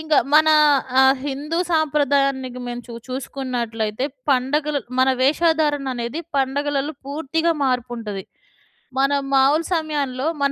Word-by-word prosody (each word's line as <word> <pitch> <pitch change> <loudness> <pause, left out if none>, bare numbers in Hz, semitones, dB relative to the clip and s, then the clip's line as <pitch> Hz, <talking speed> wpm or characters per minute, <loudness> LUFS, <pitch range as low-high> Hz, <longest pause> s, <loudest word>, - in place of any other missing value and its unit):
ఇంకా 310 -2 +2 0.2
మన 310 +1 +6 0.5
ఆహ్, 265 0 +5
హిందూ 295 +4 -3
సాంప్రదాయానికి 275 -5 +1
మేము 240 0 -5
చూ 240 - -10 0.2
చూసుకున్నట్లయితే 245 -4 -3 0.3
పండగలు 285 +3 +1 0.2
మన 260 - +4
వేషధారణనేది, 290 -3 +1 0.2
పండగలలో 280 +2 0
పూర్తిగా 320 +3 0
మార్పుంటది. 240 -6 -3 0.7
మనం 280 +1 +2
మామూలు 280 +5 +4
సమయంలో 290 -5 -2 0.2
మన 280 - +3
275 Hz, 105 wpm, -21 LUFS, 255-300 Hz, 0.7 s, మన